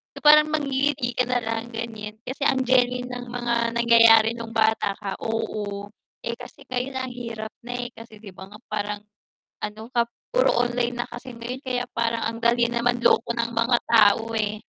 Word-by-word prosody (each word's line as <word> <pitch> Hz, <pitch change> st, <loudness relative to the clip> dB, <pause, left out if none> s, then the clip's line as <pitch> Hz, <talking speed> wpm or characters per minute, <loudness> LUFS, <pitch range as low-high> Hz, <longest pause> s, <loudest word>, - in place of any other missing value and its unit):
so, -, -, -8 dB
parang 300 Hz, 0 st, +8 dB
mangngiti 280 Hz, -3 st, 0 dB
ka 250 Hz, +1 st, 0 dB
nalang 225 Hz, -1 st, -1 dB
gan'yan 220 Hz, -2 st, -6 dB
kasi 260 Hz, +3 st, -7 dB
ang 260 Hz, -1 st, +2 dB
genuine 250 Hz, 0 st, +2 dB
ng 245 Hz, 0 st, -6 dB
mga 235 Hz, -1 st, -1 dB
nangyayari 230 Hz, -1 st, +6 dB
nung 230 Hz, -1 st, -8 dB
bata 220 Hz, -2 st, +2 dB
ka, 200 Hz, -2 st, -4 dB
oo. 205 Hz, -2 st, -3 dB, 0.4 s
Eh, 235 Hz, -, -1 dB
kasi -, -, -11 dB
ngayon 255 Hz, +1 st, -3 dB
ang 260 Hz, -1 st, -3 dB
hirap 230 Hz, -3 st, -6 dB
na, 245 Hz, +1 st, -6 dB
eh, 240 Hz, -, -7 dB
kasi 225 Hz, -1 st, -13 dB
'di 205 Hz, -2 st, -11 dB
ba 190 Hz, +1 st, -11 dB
nga 210 Hz, -, -12 dB
parang 210 Hz, -1 st, -3 dB, 0.7 s
ano 215 Hz, +1 st, -5 dB
ka 235 Hz, -1 st, +2 dB, 0.3 s
puro -, -, +3 dB
online 240 Hz, 0 st, -1 dB
na 240 Hz, -, -2 dB
kasi 255 Hz, +2 st, -9 dB
ngayon 240 Hz, +3 st, -6 dB
kaya 250 Hz, -1 st, -1 dB
parang 230 Hz, 0 st, 0 dB
ang 230 Hz, 0 st, -2 dB
dali 235 Hz, 0 st, +4 dB
na 235 Hz, 0 st, -1 dB
manloko 245 Hz, -1 st, +3 dB
ng 235 Hz, 0 st, -2 dB
mga 230 Hz, +1 st, +3 dB
tao, 225 Hz, 0 st, +5 dB
eh. 215 Hz, 0 st, -1 dB
235 Hz, 185 wpm, -24 LUFS, 225-245 Hz, 0.7 s, parang